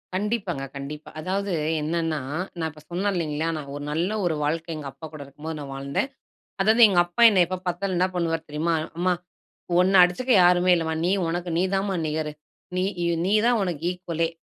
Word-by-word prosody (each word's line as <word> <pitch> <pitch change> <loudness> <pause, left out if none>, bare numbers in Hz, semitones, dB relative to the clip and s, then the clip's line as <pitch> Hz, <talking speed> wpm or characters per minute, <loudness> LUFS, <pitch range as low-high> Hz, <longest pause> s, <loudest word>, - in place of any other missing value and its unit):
கண்டிப்பாங்க, 195 -7 -2
கண்டிப்பா. 145 +2 -7
அதாவது 195 +4 -2 0.3
என்னன்னா 160 0 -1 0.4
நான் 160 -1 -1
இப்ப 150 0 -16
சொன்னேன் 190 +4 0
இல்லைங்களா, 160 -2 -1
நான் 140 -2 -7
ஒரு 145 - -6
நல்ல 170 +5 0 0.2
ஒரு 165 -3 +1
வாழ்க்கை 165 +2 -1
எங்க 150 -2 -6
அப்பா 160 - -10
கூட 155 - -8
இருக்கும்போது, 155 +3 -7
நான் 140 -2 -7
வாழ்ந்தேன். 140 - -2 0.5
அதாவது 220 +4 +4
எங்க 185 -3 +1
அப்பா, 175 +7 -1
என்னை 185 -3 +5
எப்போ 185 +2 -3
பார்த்தாலும் 180 +1 -1
என்ன 185 - +4
பண்ணுவார் 165 -2 -1
தெரியுமா 160 +3 0 0.2
"அம்மா, 180 +1 +2 0.7
உன்ன 185 +1 +5
அடிச்சுக்க 245 +9 +1
யாருமே 180 +1 +5
இல்லம்மா. 160 -1 -1
நீ 180 - +2 0.2
உனக்கு 175 +1 -2
நீதான்மா 190 +2 0
நிகரு. 155 0 -2 0.4
நீ 185 - +2 0.4
நீதான் 220 +4 +3
உனக்கு 170 -5 -3
ஈக்வலே." 165 -2 -2
170 Hz, 170 wpm, -25 LUFS, 155-185 Hz, 0.7 s, என்னை